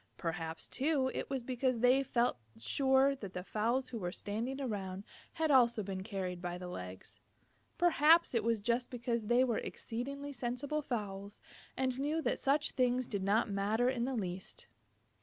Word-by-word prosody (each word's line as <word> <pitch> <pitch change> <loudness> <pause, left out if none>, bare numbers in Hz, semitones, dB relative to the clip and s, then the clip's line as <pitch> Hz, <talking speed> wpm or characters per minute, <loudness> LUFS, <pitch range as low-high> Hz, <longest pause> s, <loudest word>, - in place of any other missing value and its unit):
Perhaps, 165 -1 -4
too, 270 -2 +1
it - - -4
was 265 -3 -2
because 255 0 0
they 250 +3 +5
felt 240 - +1 0.2
sure 265 - +3
that 200 -6 -8
the 180 - -3
fowls 235 +6 0
who 235 - -5
were 175 -3 -3
standing 230 +8 -3
around 195 -7 -3 0.3
had 315 -1 +1
also 235 -5 +5
been 190 -1 -4
carried 190 -3 -4
by 175 -1 -3
the 180 0 -7
legs. 90 - -8 0.6
Perhaps 330 -2 +5
it 230 -3 +1
was 230 -2 +1
just 240 +3 0
because 235 -3 -2
they 240 +2 +5
were 240 -4 +1
exceedingly 280 +5 -5
sensible 260 +4 -2
fowls 205 -6 -4 0.4
and 260 -1 0
knew 300 +4 0
that 320 - 0
such 285 +2 +2
things 250 -1 +1
did 200 -4 -3
not 205 +3 +2
matter 215 +5 +2
in 240 -2 -1
the 265 0 -2
least. 190 - -5
240 Hz, 170 wpm, -34 LUFS, 200-265 Hz, 0.6 s, they